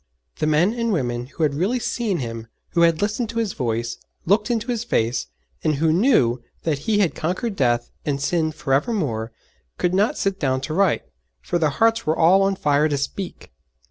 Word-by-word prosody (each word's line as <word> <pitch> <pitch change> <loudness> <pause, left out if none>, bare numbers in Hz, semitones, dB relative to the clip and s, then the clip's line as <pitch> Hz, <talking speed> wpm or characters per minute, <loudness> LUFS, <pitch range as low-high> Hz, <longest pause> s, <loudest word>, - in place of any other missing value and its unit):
The 155 - +1
men 160 +7 +3
and 230 -1 -1
women 120 -8 -1
who 160 - -4
had 145 -2 +2
really 190 - 0
seen 230 -5 -1
Him, 115 -4 -5 0.2
who 170 - +1
had 165 +1 +4
listened 215 +2 -1
to 230 - -6
His 225 -4 0
voice, 115 -3 -2 0.3
looked 210 +4 +2
into 230 0 -1
His 235 -2 -2
face, 115 - 0 0.4
and 155 - +2
who 155 +2 +2
knew 165 - +3 0.2
that 155 -4 0
He 215 - +3
had 180 - +2
conquered 185 +7 -2
death 120 -5 +1
and 140 -2 -1
sin 160 +2 0
for 145 -3 -3
evermore, 135 - 0 0.5
could 180 - 0
not 200 +4 +2
sit 195 0 -1
down 130 -3 +1
to 155 +4 -4
write, 190 -1 +2 0.4
for 170 - -2
their 155 -2 +3
hearts 225 +8 +1
were 155 - +2
all 175 +4 +5
on 195 0 +2
fire 150 -2 +2
to 145 - 0
speak. 175 +7 -5
160 Hz, 200 wpm, -22 LUFS, 135-205 Hz, 0.5 s, all